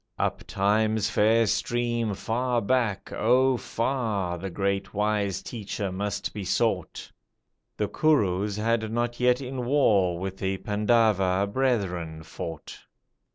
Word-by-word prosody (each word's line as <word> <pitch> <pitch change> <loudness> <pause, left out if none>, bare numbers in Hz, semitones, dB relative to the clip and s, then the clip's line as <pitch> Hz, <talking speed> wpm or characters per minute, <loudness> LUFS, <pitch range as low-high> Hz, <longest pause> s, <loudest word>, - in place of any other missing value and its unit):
Up - - -1
Time's 110 +2 +1
fair 110 +2 +4
stream 120 -1 0
far 120 +4 0
back, 115 -3 0
oh 130 +4 +3
far, 110 -8 -2
The 95 +2 -4
great 100 +2 -2
wise 105 -2 0
teacher 105 -3 -4
must 100 +1 -3
be 105 - -5
sought! 110 +5 -1 0.7
The - - 0
Kurus 105 -10 +1
had 110 0 0
not 120 +1 -1
yet 125 +1 +3
in 130 -1 -4
war 105 -10 +3
With 95 +1 -5
the 95 0 -2
Pandava 105 -2 +2
brethren 95 -9 -1
fought. 80 0 -7
105 Hz, 120 wpm, -26 LUFS, 95-120 Hz, 0.7 s, fair